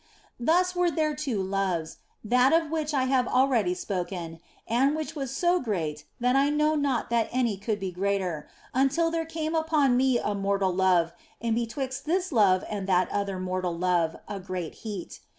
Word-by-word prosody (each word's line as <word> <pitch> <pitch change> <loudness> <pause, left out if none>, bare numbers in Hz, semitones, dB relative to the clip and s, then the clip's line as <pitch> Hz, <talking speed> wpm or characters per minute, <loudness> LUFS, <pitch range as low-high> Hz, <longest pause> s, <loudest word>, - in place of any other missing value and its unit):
Thus 360 +8 +2
were 355 -1 +3
there 310 -1 0
two 265 -10 -2
loves, 190 -4 -2 0.3
that 250 +5 +4
of 325 -2 +2
which 310 -2 -1
I 275 -3 +1
have 255 -1 +2
already 250 -8 +2
spoken 175 -3 -4 0.3
and 265 +6 +2
which 315 +1 -4
was 275 -3 -3
so 350 +7 +2
great 160 - -3
that 250 +1 +2
I 275 +1 +4
knew 300 +1 +2
not 275 -6 0
that 230 -1 +2
any 240 -4 +1
could 205 +2 -3
be 190 -2 -3
greater, 185 -4 -2 0.2
until 280 +6 +2
there 330 -1 -1
came 320 -1 -3
upon 315 -5 +2
me 260 0 +3
a 210 - -1
mortal 195 -1 0
love, 180 -2 +3 0.3
and 230 -1 -1
betwixt 245 +3 -3
this 360 +3 0
love 200 -7 +4
and 200 -2 -4
that 185 -1 +2
other 200 -2 -2
mortal 185 -2 -2
love 175 -2 +1
a 205 -1 -5
great 185 -3 -5
heat. 205 -5 -6
230 Hz, 180 wpm, -27 LUFS, 185-290 Hz, 0.3 s, that